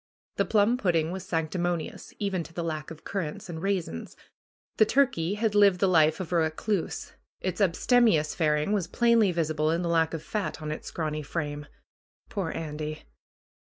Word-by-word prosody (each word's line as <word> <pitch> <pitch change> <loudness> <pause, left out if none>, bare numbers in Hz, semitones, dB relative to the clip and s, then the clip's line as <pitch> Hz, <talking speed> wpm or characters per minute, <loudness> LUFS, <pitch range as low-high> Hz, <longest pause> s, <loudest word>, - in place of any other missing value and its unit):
The - - +2
plum 220 +3 +3
pudding 170 -7 +1
was 190 0 -6
sanctimonious, 170 0 -2
even 195 -3 -1
to 165 - -13
the 170 - -3
lack 155 -2 -4
of 160 -1 -10
currants 175 -4 -4
and 160 -2 -5
raisins. 180 - -3 0.6
The 215 - +6
turkey 210 -11 +2
had 215 0 0
lived 200 -3 +5
the 195 - +3
life 160 -3 +4
of 180 -3 -5
a 175 - +3
recluse; 165 +4 -1 0.3
its 185 +2 -3
abstemious 190 -3 +3
faring 150 +1 +1
was 200 -5 +1
plainly 230 -1 +3
visible 155 -2 0
in 165 +2 0
the 170 - -1
lack 165 -1 +2
of 160 - -6
fat 210 -2 -3
on 155 -1 -4
its 155 - -6
scraray 155 -2 -2
frame. 145 -1 -4 0.6
Poor 195 -6 -2
Andy 155 -1 -5
170 Hz, 170 wpm, -27 LUFS, 155-200 Hz, 0.6 s, The